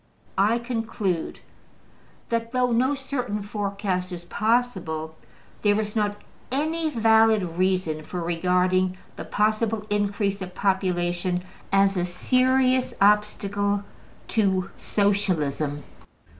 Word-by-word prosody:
I 210 +4 +4
conclude 225 -7 -3 0.9
that, 230 +1 -2
though 250 -1 +2
no 255 +5 +2
certain 250 -6 -3
forecast 200 -3 -2
is 175 -1 -7
possible, 190 -8 0 0.5
there 205 0 +3
is 210 0 -3
not 205 -1 0 0.3
any 315 +4 0
valid 225 -4 +4 0.2
reason 185 -5 +1
for 180 +3 -5
regarding 180 +2 +1 0.2
the - - -7
possible 215 0 0
increase 205 -1 0
of 185 -1 -7
population 180 -2 0 0.3
as 195 0 +3
a 175 - +1
serious 255 +7 +2
obstacle 205 0 +2 0.5
to 190 -4 +1
Socialism. 155 -8 0
205 Hz, 100 wpm, -25 LUFS, 185-225 Hz, 0.9 s, I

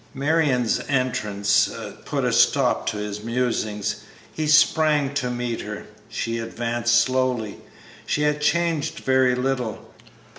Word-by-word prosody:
Marion's 140 -4 +1
entrance 105 -7 +1 0.4
put - - -1
a - - +1
stop - - +3
to 110 - -1
his 105 0 -5
musings. 115 -3 -1 0.4
He 155 -1 -2
sprang 150 -2 +4
to 130 -3 -1
meet 120 -1 -3
her, 105 0 -7 0.2
she 115 0 -3
advanced 120 +1 0
slowly. 125 -4 0 0.5
She 150 - 0
had 150 0 +1
changed 165 -1 0
very 130 -1 +3
little. 125 -3 -3
125 Hz, 120 wpm, -23 LUFS, 115-140 Hz, 0.5 s, sprang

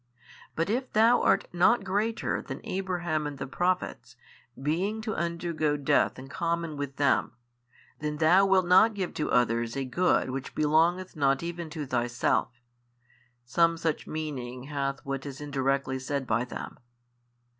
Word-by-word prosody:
But 165 - 0
if 255 +3 -2
Thou 230 +2 +5
art - - +3
not 195 +6 +4
greater 205 +4 -1
than - - -7
Abraham 175 -5 -2
and 145 -1 -6
the 135 - -4
Prophets, 135 -7 -2 0.4
being 175 +10 -1
to 220 -1 -2
undergo 170 -2 -1
death 140 - +2
in 130 - -9
common 170 +2 -2
with 140 -1 -5
them, 140 -2 +2 0.7
then 150 0 -3
Thou 175 +5 +5
wilt 190 -1 +4
not 195 +5 +5
give 190 -3 -3
to 155 - -2
others 115 0 +1
a 135 - -1
good 130 0 +1
which 135 0 -6
belongeth 165 +5 +2
not 140 -1 +2
even 170 -1 -5
to 150 -1 -5
Thyself: 120 -1 0 1.0
some 165 +6 +2
such 165 -2 -2
meaning 130 -5 -5
hath 140 -1 -3
what 135 -1 -3
is 140 -2 -7
indirectly 135 -2 -1
said 140 +1 -3
by 115 +1 0
them. 125 - -8
155 Hz, 150 wpm, -28 LUFS, 135-175 Hz, 1.0 s, Thou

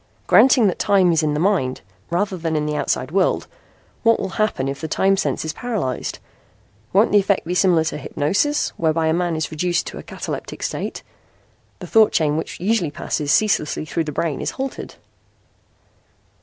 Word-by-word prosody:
Granting 255 -3 +6
that 190 - 0
time 195 -3 +3
is 165 - +2
in 150 -1 0
the - - -1
mind 170 -9 +1 0.3
rather 190 +3 0
than 165 -2 -2
in 150 -1 0
the 150 0 -2
outside 140 -1 -1
world, 190 +1 +1 0.6
what 230 -1 +3
will 195 - -3
happen 170 -11 0
if 135 0 -4
the 160 - -3
time 195 +5 +2
sense 190 - -2
is 160 - -3
paralyzed? 200 - -3 0.7
Won't 205 +4 +4
the 205 - +6
effect 200 -2 0
be 175 - -2
similar 180 -3 +3
to 160 - -3
hypnosis 200 - 0
whereby 160 0 +1
a 160 - +2
man 175 -1 0
is 155 - -3
reduced 170 +2 0
to - - -7
a - - -9
cataleptic - - -6
state? - - -4 0.7
The - - -8
thought 220 -2 +4
chain 150 -2 +2
which 160 - -4
usually 190 -2 +1
passes 145 0 -2
ceaselessly 210 -9 +1
through 160 +1 -2
the 150 - -4
brain 155 +1 -2
is - - -1
halted." 270 0 -6
170 Hz, 185 wpm, -21 LUFS, 155-200 Hz, 0.7 s, Granting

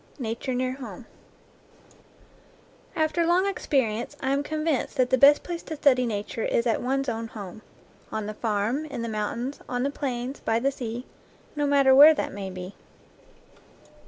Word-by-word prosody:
NATURE 245 0 -3
NEAR 255 0 0
HOME 245 -4 -9 1.9
After 315 +2 +1
long 350 +3 +3
experience 270 - -1
I 265 - -1
am 280 +1 +1
convinced 305 -1 -2
that 255 -1 +2
the 260 - +5
best 285 +2 +7
place 345 -1 -5
to 315 - -6
study 255 -4 +3
nature 210 +1 -4
is 235 - +1
at 230 - +1
one's 270 +2 -1
own 230 -1 -3
home, 205 -2 -9 0.5
on 220 -1 -3
the 215 - -4
farm, 220 +7 -1
in 275 -6 -5
the - - -3
mountains, 230 +5 -3
on 245 0 -1
the 280 - 0
plains, 260 -1 -4
by 225 - 0
the 270 +4 +1
sea, 240 -1 -6 0.5
no 290 -1 0
matter 275 -2 +5
where 295 +4 +9
that - - -3
may 195 -1 -5
be. 185 +1 -8
255 Hz, 165 wpm, -26 LUFS, 225-285 Hz, 1.9 s, where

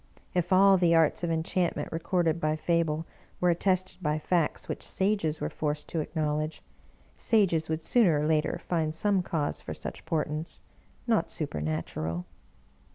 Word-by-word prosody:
If 180 0 0
all 195 +1 +7
the 170 -2 +4
arts 165 +1 +3
of 170 - 0
enchantment 165 +2 -1
recorded 165 0 0
by 155 0 +1
Fable 160 0 0 0.3
were 180 -1 +4
attested 185 +2 0
by 150 -2 0
facts 165 0 0
which - - -4
Sages 190 -6 0
were - - -1
forced 150 -1 -2
to 165 - -1
acknowledge, 155 0 -2 0.6
Sages 175 -8 +2
would 160 0 -2
sooner 180 -8 +4
or 150 - 0
later 155 -1 +1
find 160 -3 0
some 200 +2 +2
cause 155 -4 -2
for - - -6
such - - -7
portents 155 0 -2 0.2
— - - -34 0.2
not - - +1
su - - -2
pernatural. 80 +2 -3
160 Hz, 160 wpm, -28 LUFS, 155-180 Hz, 0.6 s, all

